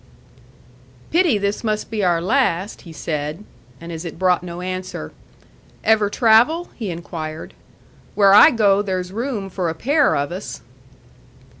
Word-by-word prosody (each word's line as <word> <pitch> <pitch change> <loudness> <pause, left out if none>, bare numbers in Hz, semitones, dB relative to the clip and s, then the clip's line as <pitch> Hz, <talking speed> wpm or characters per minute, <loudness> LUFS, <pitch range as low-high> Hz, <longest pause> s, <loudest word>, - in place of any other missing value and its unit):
"Pity 335 - +3
this 200 +2 -2
must 215 -1 -2
be 215 -2 -1
our 175 -2 +2
last," 200 -1 0
he 170 - -12
said; 155 +2 -4 0.4
and 170 +1 -9
as 165 0 -6
it 165 -3 -7
brought 180 -1 +2
no 175 -1 -7
answer, 185 - -5 0.7
"Ever 215 -2 +3
travel?" 240 +11 +3
he 220 -5 -5
inquired. 165 -2 -7 0.6
"Where 200 -2 +5
I 205 - +9
go, 205 -4 +3
there's 185 -2 -3
room 230 -3 -3
for 180 -2 -3
a 160 - -4
pair 285 - +2
of 140 +3 -2
us." 185 +3 -7
195 Hz, 145 wpm, -20 LUFS, 170-220 Hz, 0.7 s, I